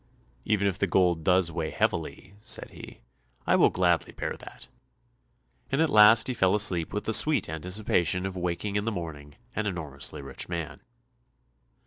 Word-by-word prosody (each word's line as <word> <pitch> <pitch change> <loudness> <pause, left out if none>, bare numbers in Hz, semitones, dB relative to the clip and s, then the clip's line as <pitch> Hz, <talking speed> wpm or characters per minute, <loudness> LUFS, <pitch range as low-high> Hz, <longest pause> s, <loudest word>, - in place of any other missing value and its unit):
"Even 105 -2 +1
if 95 0 -2
the 100 - +1
gold 85 -2 +1
does 90 0 +3
weigh 80 -1 -3
heavily," 95 - -3
said - - -3
he, - - -12 0.4
"I - - +3
will - - +5
gladly 90 -2 0
bear - - -5
that," - - -13 1.0
and 135 - 0
at 160 -1 +2
last 110 +1 +6
he 130 - -1
fell 95 -4 +2
asleep 90 -6 +1
with 105 - -4
the 110 - -2
sweet 150 +6 +5
anticipation 90 +2 0
of 95 -1 -5
waking 90 +3 -3
in 105 - -2
the 115 - -1
morning 75 -6 -8 0.2
an 110 0 -2
enormously 70 -8 -4
rich 70 +4 -5
man. 85 -3 -5
90 Hz, 165 wpm, -27 LUFS, 85-105 Hz, 1.0 s, last